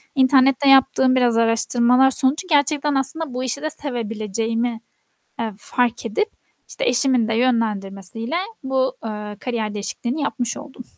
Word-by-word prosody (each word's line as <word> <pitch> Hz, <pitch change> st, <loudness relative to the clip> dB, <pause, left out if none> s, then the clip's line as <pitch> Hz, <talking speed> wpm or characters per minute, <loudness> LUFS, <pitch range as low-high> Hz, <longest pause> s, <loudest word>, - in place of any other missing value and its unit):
internette 270 Hz, +1 st, +3 dB
yaptığım 265 Hz, -1 st, +3 dB
biraz 245 Hz, -3 st, +1 dB
araştırmalar 235 Hz, +3 st, +3 dB
sonucu 275 Hz, +8 st, +7 dB
gerçekten 295 Hz, -2 st, 0 dB
aslında 270 Hz, +2 st, 0 dB
bu 250 Hz, +1 st, -4 dB
işi 260 Hz, +2 st, -3 dB
de 310 Hz, -, -3 dB
sevebileceğimi, 230 Hz, -4 st, -4 dB, 0.6 s
eee, 225 Hz, -1 st, -4 dB
fark 240 Hz, 0 st, -2 dB
edip, 230 Hz, -, -2 dB, 0.4 s
işte, -, -, -3 dB
eşimin 250 Hz, -2 st, +1 dB
de 225 Hz, -, -1 dB
yönlendirmesiyle 225 Hz, -, -1 dB, 0.3 s
bu, 265 Hz, -1 st, -2 dB
eee, 210 Hz, -1 st, -7 dB
kariyer 225 Hz, -4 st, -4 dB
değişikliğini 235 Hz, +7 st, -4 dB
yapmış 250 Hz, -4 st, -3 dB
oldum. 280 Hz, -3 st, -11 dB
250 Hz, 130 wpm, -20 LUFS, 225-270 Hz, 0.6 s, sonucu